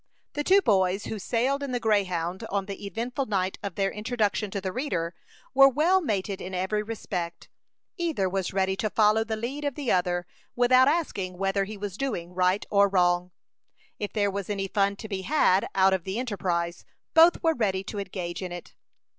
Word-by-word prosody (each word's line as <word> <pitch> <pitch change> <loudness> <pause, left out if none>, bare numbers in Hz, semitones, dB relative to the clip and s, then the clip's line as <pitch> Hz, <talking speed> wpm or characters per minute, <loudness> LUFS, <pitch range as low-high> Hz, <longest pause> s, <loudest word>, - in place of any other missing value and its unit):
The 295 - -2
two 390 +4 +5
boys 190 -1 +2
who 220 - -4
sailed 250 +7 0
in 275 -2 -4
the 245 - 0
Greyhound 185 -5 0
on 195 -1 -1
the 200 0 -6
eventful 245 +6 -3
night 190 -2 -1
of 200 -4 -5
their 195 -1 0
introduction 210 -1 -1
to 200 - -3
the 190 -1 -3
reader, 180 - -2 0.4
were 275 0 +8
well 330 +8 +3
mated 200 - -2
in 185 +1 -5
every 190 +4 0
respect. 190 -6 -5 0.5
Either 325 - 0
was 190 0 -2
ready 190 0 +1
to 215 - -1
follow 215 +1 +3
the 225 0 -3
lead 250 +7 -4
of 285 -3 -2
the 280 -5 -1
other, 175 -1 +1 0.3
without 255 +1 +5
asking 205 - -1
whether 195 +1 0
he 210 +1 -8
was 200 -1 -5
doing 180 -10 -3
right 185 +2 +1
or 200 -1 +5
wrong. 180 -1 +2 0.7
If 205 - -3
there 205 -2 +1
was 200 0 -4
any 195 -1 -2
fun 200 +1 +1
to 220 - -8
be 195 -3 -3
had 195 -6 +3
out 190 0 +5
of 190 -3 -1
the 190 +3 -4
enterprise, 175 -8 -2 0.3
both 330 +1 +6
were 325 -1 +4
ready 195 -8 0
to 205 +1 -5
engage 185 -3 -5
in 185 -1 -5
it. 175 -1 -8
200 Hz, 195 wpm, -27 LUFS, 185-235 Hz, 0.7 s, were